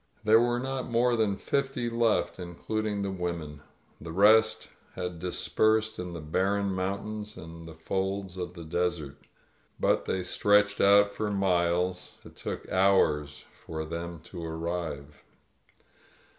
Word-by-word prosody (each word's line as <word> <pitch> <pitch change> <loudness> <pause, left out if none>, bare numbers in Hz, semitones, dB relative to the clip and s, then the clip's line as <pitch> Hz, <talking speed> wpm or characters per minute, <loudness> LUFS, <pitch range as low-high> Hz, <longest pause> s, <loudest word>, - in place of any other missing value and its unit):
There 110 +1 +6
were 120 +1 +2
not 130 0 -3
more 120 +1 +3
than 105 -4 +1
fifty 135 -3 -1
left, 115 -4 +1
including 100 +4 -3
the 100 - -2
women 85 -5 -4 0.2
— - - -34
^the 80 - -6
rest 110 +3 +5 0.3
had 90 -1 -4
dispersed 110 +5 +1
in 90 -1 -5
the 85 - -5
barren 95 +5 0
mountains 105 +3 -4
and 80 0 -10
the 80 - -10
folds 95 +3 -3
of 90 -1 -5
the 85 - -8
desert 80 -3 -2 0.3
— - - -38
^but - - +2
they 95 - -1
stretched 105 +2 +3
out 100 +1 +6
for 105 +1 -2
miles; 90 -2 0
it - - -13
took - - -6
hours 75 -6 +2 0.2
for 80 -1 -5
them 85 +1 -5
to 85 +1 -9
arrive. 80 -3 -4
95 Hz, 145 wpm, -28 LUFS, 85-105 Hz, 0.3 s, There